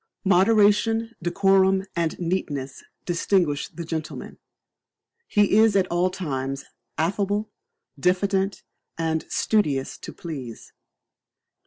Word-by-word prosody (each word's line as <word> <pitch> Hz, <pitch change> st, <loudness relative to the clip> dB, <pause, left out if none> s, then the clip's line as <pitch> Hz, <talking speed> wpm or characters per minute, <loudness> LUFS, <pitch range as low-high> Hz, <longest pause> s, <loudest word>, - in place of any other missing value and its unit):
Moderation, 210 Hz, +4 st, +3 dB
decorum, 190 Hz, +2 st, +3 dB
and 165 Hz, -2 st, -1 dB
neatness 145 Hz, -7 st, -3 dB, 0.2 s
distinguish 170 Hz, -4 st, +1 dB
the 170 Hz, -, -8 dB
gentleman; 160 Hz, -1 st, -6 dB, 0.9 s
he 205 Hz, -1 st, +3 dB
is 220 Hz, -2 st, +5 dB
at 195 Hz, -2 st, +4 dB
all 175 Hz, +2 st, +2 dB
times 135 Hz, -7 st, -4 dB, 0.3 s
affable, 205 Hz, +5 st, -1 dB, 0.5 s
diffident, 190 Hz, +3 st, +1 dB, 0.3 s
and 160 Hz, -1 st, -1 dB
studious 145 Hz, -12 st, 0 dB
to -, -, -8 dB
please. 135 Hz, -9 st, -8 dB
185 Hz, 95 wpm, -24 LUFS, 160-200 Hz, 0.9 s, is